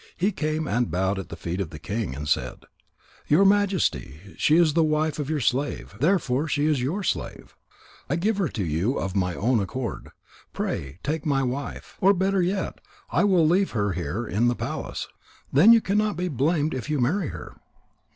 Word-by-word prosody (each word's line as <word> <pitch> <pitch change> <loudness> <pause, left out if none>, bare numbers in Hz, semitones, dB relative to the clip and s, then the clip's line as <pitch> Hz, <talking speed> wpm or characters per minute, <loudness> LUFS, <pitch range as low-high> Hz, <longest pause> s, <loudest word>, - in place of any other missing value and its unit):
He 195 +4 +1
came 155 -3 -2
and 120 -1 0
bowed 95 +4 0
at 95 - -7
the - - -6
feet 85 +3 -4
of 90 - -3
the 75 - -9
king 100 - -3
and 75 +2 -5
said: 70 - -1 0.6
"Your 170 +7 +5
Majesty, 155 - +1
she 150 - +3
is 165 -3 +4
the 165 +1 +3
wife 155 0 0
of 145 -1 -3
your 155 -1 0
slave, 135 -2 -1
therefore 150 -3 +1
she 150 -1 0
is 150 -4 +2
your 170 +11 -2
slave. - - -4 0.5
I - - +1
give 200 +5 0
her 195 -4 +1
to 105 -9 -3
you 85 - 0
of 95 0 -3
my 90 -3 0
own 120 +3 +2
accord. 115 +3 -4 0.4
Pray 70 +3 -3
take 155 0 -2
my 140 -3 +1
wife. 130 +3 -5
Or 195 +1 +5
better 190 +1 +1
yet, 185 +2 -2 0.3
I - - +3
will 180 -6 +4
leave 190 +4 +2
her 105 -1 +1
here 90 +6 -3
in 110 +3 +1
the 120 - +2
palace. - - -4 0.5
Then 165 +12 +7
you 230 -1 +7
cannot 210 +1 0
be 180 +1 -1
blamed 150 +2 +1
if 130 +3 -5
you 150 -2 0
marry 160 +8 +1
her." - - -8
145 Hz, 195 wpm, -25 LUFS, -, 0.6 s, Then